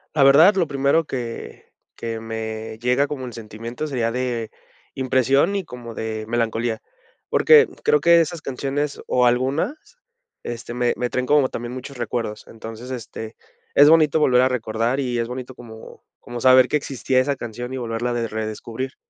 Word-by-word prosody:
La 140 - +4
verdad, 160 +9 +7
lo 180 - +2
primero 140 +2 +1
que 120 -4 -6 0.3
que 115 -1 -4
me 110 0 -5
llega 125 +4 +2
como 140 -3 -5
el 120 - -8
sentimiento, 115 +5 -7
sería 120 -5 -1
de 120 -3 -2 0.4
impresión 135 - +2
y 195 - -4
como 120 -4 -9
de 110 -1 -4
melancolía, 115 -1 -1 0.5
porque 455 -1 +6 0.2
creo 450 0 +4
que 170 0 +6
esas 165 0 -3
canciones 140 +2 -3
o 125 -1 +3
algunas, 130 - +1 0.7
este, 120 0 -6
me 120 0 +1
me 125 - -2
traen 125 +1 -1
como 145 -1 +3
también 120 +1 -6
muchos 130 +1 -8
recuerdos, 115 -3 -4
entonces, 115 +3 -9
este, 110 -2 -7 0.4
es 145 +1 +8
bonito 160 -1 +5
volver 125 -3 +4
a 130 - +4
recordar, 120 +1 -1
y 125 -3 -1
es 115 - -1
bonito 130 +1 -7
como 110 -2 -12 0.2
como 120 0 -7
saber 130 0 +6
que 150 - +2
existía 130 -2 -1
esa 140 +2 +1
canción, 120 0 -6
y 130 - -3
volverla 120 0 -2
a - - -1
de 115 -1 -2
redescubrir. 110 +4 -5
125 Hz, 175 wpm, -22 LUFS, 115-140 Hz, 0.7 s, es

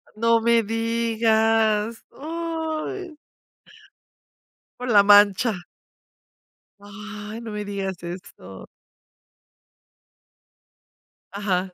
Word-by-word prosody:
No 230 +1 +3
me 230 0 +3
digas, 225 -1 +1
uy. 325 +3 -5 1.6
Por 250 - -5
la 210 -4 +6
mancha. 205 -1 +4 1.2
Ay, 210 +2 -9
no 230 -2 -7
me 210 0 -5
digas 195 -3 -4
eso. 170 - -9 2.7
Ajá. 190 -2 -2
220 Hz, 65 wpm, -23 LUFS, 205-230 Hz, 2.7 s, la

